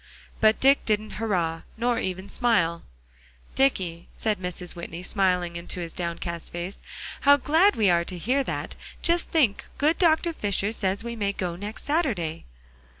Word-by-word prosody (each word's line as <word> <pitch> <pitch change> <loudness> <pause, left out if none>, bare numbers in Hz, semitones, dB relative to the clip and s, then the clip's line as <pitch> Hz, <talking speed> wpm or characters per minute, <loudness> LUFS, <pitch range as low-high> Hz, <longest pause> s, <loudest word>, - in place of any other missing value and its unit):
But 220 0 +4
Dick 275 +1 +5
didn't 215 0 0
"hurrah," 170 -7 0 0.2
nor 235 0 +1
even 185 +1 -3
smile. 170 -9 +1 0.7
"Dicky," 185 -11 +1
said 215 -3 0
Mrs. 180 -1 -5
Whitney, 170 0 -7
smiling 180 -3 +1
into 170 +1 -6
his 170 -2 -5
downcast 170 -1 -4
face, 175 +3 -5 0.4
"how 285 0 +6
glad 325 +9 +4
we 215 - +3
are 170 0 +3
to 180 - -5
hear 255 +10 +1
that; - - -3 0.3
just 340 0 +2
think, 265 -11 +2
good 305 +4 +2
Dr. 335 0 +3
Fisher 205 - -1
says 200 -1 -1
we 235 0 -4
may 200 -3 -1
go 180 -3 -3
next 205 +4 -7
Saturday." 230 - -1
200 Hz, 155 wpm, -26 LUFS, 175-245 Hz, 0.7 s, how